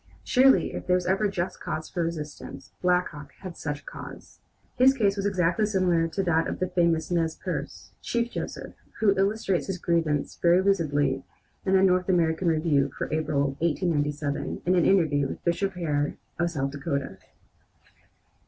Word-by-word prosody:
Surely 265 +1 +4
if - - -6
there 180 - +4
was 180 -1 -1
ever 195 +3 +2
just 185 -1 -3
cause 155 - -4
for 175 - -3
resistance, 150 -4 -6
Black 180 0 +2
Hawk 145 -2 -11
had 185 -3 -7
such 145 -1 -4
a - - -34
cause. - - -10 0.4
His 265 +2 +5
case 205 -6 +2
was 200 0 -1
exactly 185 +1 +1
similar 180 -5 +2
to 195 +4 -2
that 165 -2 +2
of - - -3
the 185 - -1
famous 170 -2 +1
Nez 165 -2 +1
Perce, - - -6
Chief 235 0 -1
Joseph, - - -6 0.3
who 200 -2 +4
illustrates 195 -1 0
his 190 -2 -2
grievance 165 -4 0
very 175 +1 +5
lucidly 145 -8 +1 0.4
in 190 - +2
the 190 0 +5
North 185 0 +3
American 170 -1 +2
Review 155 -4 +2
for - - -3
April, 145 -3 +1
1879, 150 -3 -1
in 180 +1 +3
an 175 - +3
interview 155 -7 +3
with - - -8
Bishop 195 +3 0
Hare 150 -5 -1 0.2
of 170 0 +2
South 135 -4 -2
Dakota. 140 - -4
170 Hz, 170 wpm, -26 LUFS, 150-190 Hz, 0.4 s, His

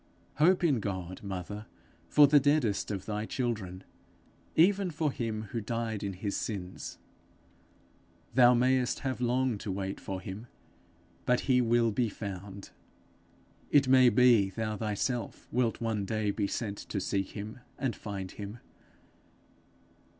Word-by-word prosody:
Hope 180 +5 +4
in 145 -8 +3
God, 95 -3 -4
mother, 100 +2 -6 0.4
for 150 - +7
the 145 +1 +6
deadest 140 -7 +1
of 95 -3 -4
thy 105 0 -3
children, 105 -7 -3 0.7
even 190 +3 +4
for 155 -2 -1
him 110 -4 -3
who 115 - -2
died 115 -1 -3
in 100 -1 -3
his 100 +2 -3
sins. 95 -4 -5 1.4
Thou 125 0 +7
mayest 125 0 +2
have 130 -2 -3
long 125 -2 +1
to 105 - -4
wait 95 0 -3
for 95 -1 -5
him 95 +6 -8 0.8
but 125 0 +3
he 125 -2 +3
will 115 -1 +3
be 115 +2 +1
found. 100 -1 -7 1.0
It 140 -2 +4
may 130 -1 +7
be, 115 -4 +5
thou 110 +2 -3
thyself 110 +3 -3
wilt 120 -2 +1
one 110 -3 -1
day 110 0 0
be 100 0 -1
sent 100 -1 -3
to 100 - -4
seek 95 0 -2
him 105 +4 -6 0.2
and 130 -4 -1
find 100 -3 -6
him. 105 +2 -7
110 Hz, 140 wpm, -30 LUFS, 100-125 Hz, 1.4 s, for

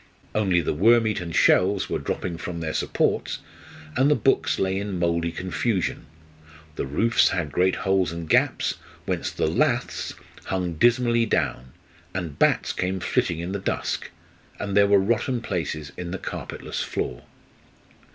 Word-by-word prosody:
Only 95 -5 +2
the - - -1
worm 115 +8 +5
eaten 90 -6 -2
shelves 95 +4 +3
were - - -2
dropping 85 -2 -3
from 85 0 -5
their 80 -1 -3
supports, - - 0 0.6
and 135 +3 +4
the 150 - +5
books 135 - +2
lay 95 0 0
in 100 -2 -3
mouldy 85 -1 0
confusion; 95 +2 -2 0.7
the 70 - -3
roofs 115 - +3
had 85 -6 -2
great 90 +4 +2
holes 95 -3 +1
and 85 -1 -6
gaps, - - +2 0.3
whence - - -1
the - - -1
laths 120 - 0 0.3
hung 90 -2 -1
dismally 120 +4 +3
down, 65 -9 -1 0.4
and 85 -6 -4
bats - - +3
came 95 +1 -1
flitting 85 - 0
in 85 +2 -4
the 100 - -2
dusk; - - -2 0.5
and 100 -1 -3
there 100 0 +6
were 100 0 +6
rotten 120 +5 +1
places 80 -8 -3
in 90 -1 -5
the 95 - -3
carpetless - - -5
floor. - - -4
95 Hz, 150 wpm, -25 LUFS, 85-110 Hz, 0.7 s, there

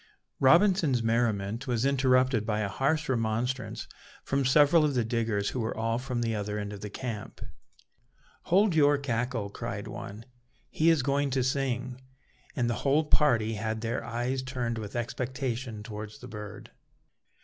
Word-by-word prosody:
Robinson's 160 - +4
merriment 115 -1 0
was 120 0 0
interrupted 130 -3 +3
by 105 -1 -1
a 105 - 0
harsh 150 +9 0
remonstrance 120 +1 -1 0.4
from 135 0 0
several 150 +4 +5
of 145 -3 +1
the 120 -2 +1
diggers, 110 -3 0
who 130 - -4
were 110 -1 -2
all 115 +1 0
from 125 -2 -3
the 115 -1 0
other 105 0 -3
end 105 0 -4
of 100 - -9
the 105 - -5
camp. 110 -1 -6 1.1
"Hold 195 +2 +4
your 145 -2 +5
cackle," 120 -5 -2
cried - - -5
one, 105 +3 -8 0.5
"he 160 +2 +3
is 160 -5 +3
going 140 +1 +1
to 130 -1 +1
sing;" 130 -1 -1 0.5
and 120 - +1
the 120 - +1
whole 145 +3 +3
party 120 -8 +3
had 110 +1 -3
their 115 +1 -2
eyes 120 +2 -2
turned 125 -3 -3
with 105 0 -7
expectation 120 -2 -3
towards 105 -1 -7
the 125 - -10
bird. 105 -3 -9
120 Hz, 160 wpm, -29 LUFS, 110-135 Hz, 1.1 s, several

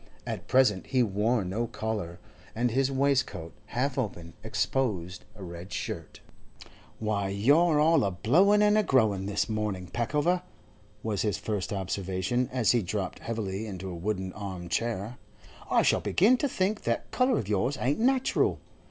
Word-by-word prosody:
At - - -5
present 125 -8 +3
he 130 -2 +3
wore 105 +1 +1
no 110 +6 -2
collar, 110 -7 -4 0.4
and 120 +1 +1
his 135 +3 +1
waistcoat, 135 -11 0
half 130 +4 -1
open, 85 -8 -4
exposed 95 -10 -1
a 100 - -10
red 85 +1 -8
shirt. - - -5 0.8
'Why, 105 -3 -1
you're 145 - +4
all 160 -1 +4
a 100 - +2
blowin' 180 - +4
and 210 +1 +4
a - - +5
growin' 110 - +2
this 100 0 0
morning, 105 -4 -2
Peckover,' 150 +9 +1 0.6
was 105 -3 -1
his 105 -2 0
first 100 -1 -3
observation, 95 +4 -1
as 125 -4 +3
he 120 - +3
dropped 95 0 -3
heavily 110 -2 -4
into 95 -2 -6
a - - -6
wooden 95 +1 -3
arm 95 -4 -6
chair. 115 +2 -2 0.5
'I - - +4
shall - - +3
begin 215 +8 +4
to 285 - 0
think 205 0 0
that - - -2
colour 255 -1 +2
of 100 - -3
yours 105 +7 0
ain't 135 - 0
natural. 260 +2 +2
110 Hz, 160 wpm, -28 LUFS, 95-135 Hz, 0.8 s, a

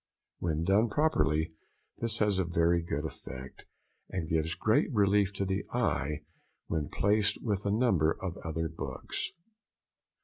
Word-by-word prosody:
When 80 -2 0
done 100 +6 +4
properly 85 - +2 0.5
this 115 -1 0
has 105 -3 +2
a - - +3
very 85 0 +2
good 75 -2 -3
effect, 65 -3 -8 0.4
and 90 -4 -3
gives 80 0 0
great 110 0 +2
relief 100 -2 +3
to 100 0 -1
the 95 +1 -1
eye 75 +1 0 0.4
when 75 -3 -2
placed 105 +1 +2
with 100 -3 -1
a - - +2
number 100 -9 +3
of 95 -2 -4
other 80 0 -2
books. 70 -5 -4
90 Hz, 140 wpm, -31 LUFS, 80-105 Hz, 0.5 s, done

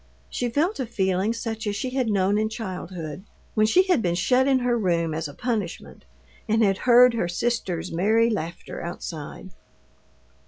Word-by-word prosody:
She 245 - -1
felt 310 - 0
a 260 - -2
feeling 190 -1 0
such 225 -1 -4
as 205 - -1
she 255 +5 -3
had 255 -3 0
known 200 0 +2
in 215 0 0
childhood, 185 -6 -6 0.3
when 215 0 +3
she 365 +12 +5
had 365 -9 +2
been 175 -4 0
shut 250 +9 +2
in 270 -1 +4
her 245 -1 +1
room 170 -7 0
as 160 0 -3
a 145 - -10
punishment, 215 -8 -4 0.4
and 220 +1 +3
had 195 -2 +2
heard 245 0 +8
her 225 -7 -1
sisters' 180 -4 -2
merry 220 +7 +3
laughter 170 -4 -5
outside. 170 +1 -7
215 Hz, 170 wpm, -24 LUFS, 180-240 Hz, 0.4 s, heard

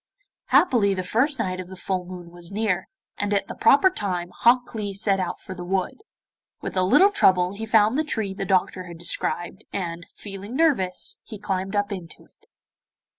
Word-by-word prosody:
Happily 220 - +4
the 185 - -2
first 260 +10 +1
night 185 -5 -2
of 185 - -6
the 190 - -9
full 185 -1 -2
moon 175 -1 -9
was 175 0 -7
near, 200 -3 -1 0.3
and 205 0 -1
at 200 - 0
the - - -6
proper 375 +7 +5
time 180 - -3
Hok 245 +1 +3
Lee 205 -3 -4
set 195 -1 +1
out 185 - -3
for 190 - -8
the 180 -1 -7
wood. 190 - -2 0.6
With - - -6
a 185 - +3
little 290 - +5
trouble 185 - +3
he 220 +2 -6
found 220 +4 +4
the - - +2
tree 220 -10 -1
the 195 0 -4
doctor 185 -1 +1
had 170 -2 -9
described, 175 +3 -3
and, 170 -3 -4
feeling 200 +3 -8
nervous, 265 - +1
he 215 - -9
climbed 195 0 -3
up 205 +1 0
into 180 -5 -8
it. - - -32
195 Hz, 190 wpm, -24 LUFS, 185-220 Hz, 0.6 s, proper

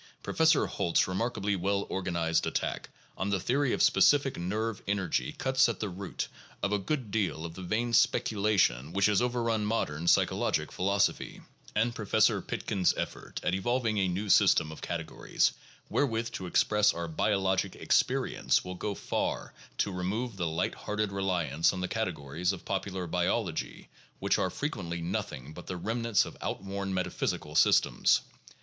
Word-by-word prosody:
Professor 160 -1 +3
Holt's 85 - +1
remarkably 100 +1 -1
well 100 +2 0
organized 85 -3 0
attack - - -2 0.3
on 95 - -2
the 100 -1 +1
theory 130 +7 +1
of - - +1
specific 140 -2 +4
nerve 105 +5 -2
energy 100 -4 0
cuts 130 -2 +2
at 115 - -3
the 105 - -2
root 95 +1 -5 0.4
of 100 - +1
a 105 - +2
good 115 +2 -3
deal 95 -7 -1
of 85 - -6
the 95 - -9
vain 115 +6 -1
speculation 100 - +2
which 100 0 +3
has 105 0 +3
overrun 115 -3 0
modern 85 -7 -1
psychologic - - +2
philosophy; 100 +2 0 0.3
and 115 +2 +2
Professor 105 -4 +2
Pitkin's 95 -3 0
effort - - -5
at - - 0
evolving 115 +2 0
a 95 - +2
new 95 +4 -2
system 80 -4 +4
of 80 - -10
categories 80 -2 -1 0.4
wherewith 115 -4 0
to 95 - -5
express 105 +3 +3
our 85 0 -3
biologic 95 +3 0
experience - - +1
will 90 - -5
go 100 +2 -3
far - - -2 0.2
to 100 - 0
remove 100 +6 -2
the 90 -3 -1
light 80 0 -1
hearted 105 -1 -2
reliance 90 -6 +1
on 95 - -4
the 90 - -1
categories 90 -5 -2
of 95 - -7
popular 95 -1 -3
biology 90 +1 -2 0.3
which - - +1
are - - +1
fre - - -5
quently 85 0 -3
nothing 75 -4 -4
but 90 - -11
the 90 - -4
remnants 115 +3 +1
of - - -9
outworn 95 0 -3
metaphysical 95 -1 -2
systems. - - +4
100 Hz, 155 wpm, -30 LUFS, 90-110 Hz, 0.4 s, specific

